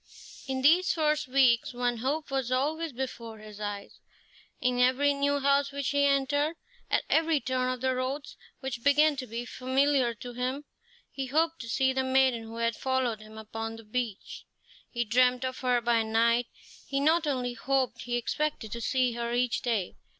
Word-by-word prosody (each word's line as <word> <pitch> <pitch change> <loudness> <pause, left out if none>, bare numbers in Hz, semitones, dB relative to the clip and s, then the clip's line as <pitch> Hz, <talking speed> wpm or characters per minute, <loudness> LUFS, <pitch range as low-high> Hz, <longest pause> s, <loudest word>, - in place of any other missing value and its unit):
In 260 -1 -2
these 345 +6 +5
first 305 -2 +1
weeks 255 -2 +3
one 245 -1 0
hope 280 +5 -2
was 265 -2 -1
always 305 +5 0
before 235 -3 -6
his 215 -1 -12
eyes. 205 -1 -6 0.6
In 250 0 0
every 260 +3 +4
new 285 0 +1
house 280 0 +2
which 280 -1 -2
he 285 0 +3
entered, 285 +3 +1 0.3
at - - +2
every 320 -1 +3
turn 255 -1 -1
of 255 -1 -5
the 260 0 +1
roads, 260 +3 -3 0.3
which 260 -3 -5
began 295 +2 +4
to 255 -1 -5
be 235 +2 -5
familiar 260 -1 +1
to 245 +3 -8
him, 255 +4 -3 0.5
he 270 -1 -4
hoped 320 +4 +1
to 230 - -8
see 265 +2 +2
the 265 0 0
maiden 260 -2 +3
who 225 0 -9
had 230 -1 0
followed 260 -4 -1
him 215 0 -13
upon 225 +1 -5
the 225 - -11
beach. 220 -2 -4 0.4
He 240 0 -2
dreamed 250 +3 +3
of 255 0 -4
her 250 -2 +1
by 235 -1 +2
night; 230 +2 +2 0.4
he 275 - -1
not 315 +2 +3
only 250 -3 -1
hoped, 255 -1 -1
he 240 0 -2
expected 240 -2 -2
to 235 - -5
see 255 +1 +1
her 235 0 -3
each 245 -1 +1
day. 220 -7 -1
255 Hz, 180 wpm, -29 LUFS, 235-280 Hz, 0.6 s, these